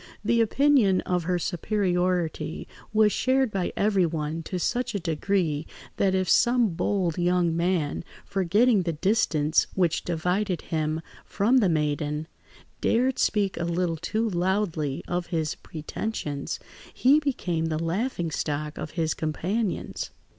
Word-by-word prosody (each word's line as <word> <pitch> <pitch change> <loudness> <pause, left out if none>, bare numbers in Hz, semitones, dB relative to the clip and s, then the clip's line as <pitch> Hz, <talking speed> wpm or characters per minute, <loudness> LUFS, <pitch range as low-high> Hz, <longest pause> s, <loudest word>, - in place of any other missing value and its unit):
The 230 +1 +3
opinion 230 -5 +4
of 180 -2 -1
her 180 0 +1
superiority 180 -3 -1 0.2
was 215 -1 +4
shared 260 0 +2
by 190 -3 -1
everyone 165 -6 +1
to 185 - -3
such 240 +5 -1
a - - 0
degree, 165 -2 -1 0.3
that 190 -1 +2
if 185 -1 +1
some 240 +6 +4
bold 180 0 -1
young 175 -1 +2
man, 170 -4 0 0.2
forgetting 200 +4 +3
the 170 -2 -1
distance 160 -4 +2
which 175 -4 +1
divided 180 +3 -1
him 155 0 -1 0.2
from 230 +6 +2
the 200 -6 +3
maiden, 150 -1 -1 0.5
dared 255 +3 +2
speak 200 -3 +1
a 170 - -2
little 170 0 0
too 215 +7 -1
loudly 175 -6 -1
of 175 0 -2
his 160 -3 -1
pretensions, 150 -2 -5 0.3
he 275 +4 +4
became 180 - -1
the 155 -1 -1
laughing 170 +1 -1
stock 150 0 -3
of 150 - -5
his 160 -1 +1
companions. 185 +7 -2
180 Hz, 130 wpm, -26 LUFS, 160-210 Hz, 0.5 s, opinion